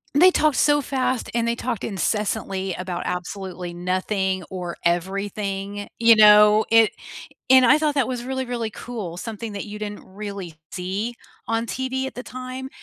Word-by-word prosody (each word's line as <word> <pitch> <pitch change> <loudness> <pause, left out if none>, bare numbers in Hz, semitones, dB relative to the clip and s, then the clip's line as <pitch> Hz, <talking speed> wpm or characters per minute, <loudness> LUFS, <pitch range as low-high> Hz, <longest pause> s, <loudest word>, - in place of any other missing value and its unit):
They 365 +5 +7
talked 305 -5 +2
so 290 0 +4
fast, 260 -2 -1
and 235 0 +1
they 235 - +2
talked 235 -3 -3
incessantly 195 -1 -1
about 180 -1 -4
absolutely 180 -1 -5
nothing 185 +1 -1
or 180 -2 -5
everything, 195 +3 -2
you 230 -1 +7
know? 210 0 +7
It 225 -1 +6 0.6
and 260 -1 +8
I 295 +5 +6
thought 300 -2 0
that 270 - +3
was 250 -2 -3
really, 260 +1 -3
really 235 -3 -3
cool, 210 -8 -6
something 220 +1 -6
that 200 - -4
you 210 0 -8
didn't 205 -1 -6
really 195 -4 -7 0.2
see 195 +6 -3 0.3
on 225 +1 0
TV 260 +1 -2
at - - -7
the 250 - -6
time, 255 +1 -7
210 Hz, 165 wpm, -23 LUFS, 190-250 Hz, 0.6 s, and